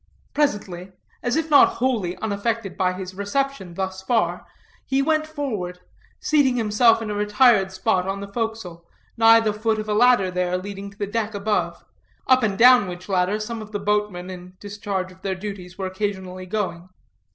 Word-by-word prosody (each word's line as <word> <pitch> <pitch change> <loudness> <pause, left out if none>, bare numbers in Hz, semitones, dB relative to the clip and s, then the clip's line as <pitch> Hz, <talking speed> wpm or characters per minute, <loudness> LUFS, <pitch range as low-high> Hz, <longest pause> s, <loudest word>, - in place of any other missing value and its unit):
Presently, 195 -10 -1 0.3
as 245 0 -1
if 320 0 -1
not 285 - +7
wholly 225 -9 -1
unaffected 220 0 -2
by 185 -1 +1
his 185 0 -7
reception 200 -1 -3
thus 190 0 -4
far, 225 +4 0 0.4
he 270 - 0
went 310 +2 +1
forward, 220 - -4 0.4
seating 285 -5 +2
himself 225 0 +3
in 215 - -4
a - - -2
retired 210 -1 +3
spot 190 -1 0
on 195 +1 -2
the 200 - -6
forecastle, 210 -5 -4 0.3
nigh 225 0 +7
the 215 -2 0
foot 220 +1 0
of 215 0 -4
a 210 - 0
ladder 215 -4 +4
there 180 0 0
leading 200 +1 -7
to 200 +1 -7
a - - -2
deck 220 0 -2
above, 205 +1 -2 0.4
up 255 0 +4
and 205 -4 0
down 245 -3 +7
which 180 0 -8
ladder 190 +2 +1
some 225 +1 -5
of 215 0 -11
the - - 0
boatmen, 200 -3 -1
in 180 0 -11
discharge 200 -2 -4
of 185 0 -18
their 190 -1 -2
duties, 185 -2 -8
were 190 - -3
occasionally 185 -1 -4
going. 185 -3 -3
205 Hz, 180 wpm, -23 LUFS, 185-225 Hz, 0.4 s, not